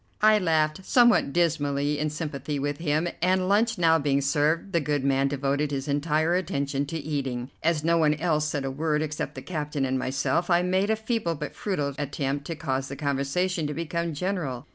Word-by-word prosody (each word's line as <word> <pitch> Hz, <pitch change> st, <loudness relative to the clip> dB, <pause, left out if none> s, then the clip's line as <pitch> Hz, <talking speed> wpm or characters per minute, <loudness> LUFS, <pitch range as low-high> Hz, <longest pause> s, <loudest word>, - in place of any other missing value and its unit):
I 215 Hz, 0 st, +6 dB
laughed 160 Hz, -1 st, +1 dB
somewhat 240 Hz, -, +4 dB
dismally 145 Hz, -3 st, +1 dB
in 155 Hz, +1 st, 0 dB
sympathy 150 Hz, -1 st, -4 dB
with 145 Hz, +1 st, -2 dB
him, 155 Hz, +1 st, 0 dB
and, 185 Hz, 0 st, +2 dB
lunch 220 Hz, +3 st, +2 dB
now 165 Hz, -1 st, +4 dB
being 140 Hz, -1 st, +1 dB
served, 150 Hz, +7 st, +1 dB
the 170 Hz, -, +3 dB
good 145 Hz, -2 st, -1 dB
man 135 Hz, 0 st, +2 dB
devoted 140 Hz, +1 st, 0 dB
his 140 Hz, 0 st, -3 dB
entire 155 Hz, +3 st, +1 dB
attention 140 Hz, -6 st, -1 dB
to 165 Hz, -, -4 dB
eating. 135 Hz, -5 st, -3 dB
As 160 Hz, -2 st, +1 dB
no 165 Hz, +1 st, +3 dB
one 150 Hz, -1 st, +3 dB
else 155 Hz, -1 st, 0 dB
said 145 Hz, -3 st, -2 dB
a 135 Hz, -, -2 dB
word 150 Hz, +2 st, 0 dB
except 150 Hz, -1 st, -4 dB
the -, -, -7 dB
captain 150 Hz, -5 st, -2 dB
and 130 Hz, 0 st, 0 dB
myself, 135 Hz, +7 st, 0 dB
I 175 Hz, 0 st, +4 dB
made 185 Hz, +3 st, +1 dB
a 220 Hz, -, +3 dB
feeble 220 Hz, -6 st, -1 dB
but 150 Hz, 0 st, -6 dB
futile 150 Hz, -9 st, -2 dB
attempt 140 Hz, 0 st, -2 dB
to 165 Hz, -, -4 dB
cause 135 Hz, -4 st, -2 dB
the 140 Hz, -, -6 dB
conversation 145 Hz, +5 st, -1 dB
to 150 Hz, -, -4 dB
become 170 Hz, 0 st, -2 dB
general. 155 Hz, -7 st, -3 dB
150 Hz, 195 wpm, -26 LUFS, 140-170 Hz, -, I